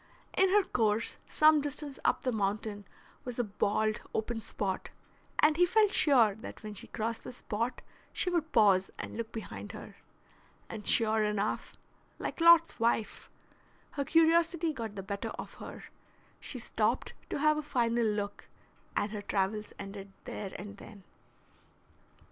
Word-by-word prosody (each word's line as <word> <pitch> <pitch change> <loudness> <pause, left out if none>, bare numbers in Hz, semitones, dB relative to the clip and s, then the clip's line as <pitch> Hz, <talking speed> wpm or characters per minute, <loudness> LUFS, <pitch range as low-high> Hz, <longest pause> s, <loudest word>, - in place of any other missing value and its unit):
In 380 0 +4
her 410 +1 +5
course 220 - 0
some 305 -1 +5
distance 290 0 -4
up - - +2
the 255 - +1
mountain 205 -1 -2 0.4
was 245 -2 -5
a 245 - +2
bald, 210 +1 0
open 225 +1 -1
spot, 195 -2 -3 0.5
and 300 0 +4
he 355 - +6
felt 420 +1 +4
sure 240 -8 +5 0.3
when 215 -1 -6
she 200 - -4
crossed 225 +1 -3
this 250 - -8
spot 230 +4 -3 0.3
she 360 - 0
would 325 -3 0
pause 195 -4 +5
and - - -6
look 225 0 -4
behind 225 - -7
her; - - -10 0.7
and 215 -2 -7
sure 220 -1 +3
enough, 210 0 -1 0.4
like - - -4
Lot's 335 -3 +7
wife, 230 -1 0 0.6
her 280 - -2
curiosity 330 +1 +3
got 225 -5 -5
the 195 - -5
better 200 +1 -4
of - - -7
her; - - -8 0.6
she - - -5
stopped - - 0 0.2
to - - -2
have 305 +1 +3
a - - -1
final 240 -5 +1
look, 205 -2 -2 0.5
and 205 - 0
her 210 -1 -4
travels 205 +1 -1
ended 195 0 -8
there 195 -2 -5
and 200 +1 -8
then. 205 -2 -12
225 Hz, 150 wpm, -31 LUFS, 210-300 Hz, 0.7 s, Lot's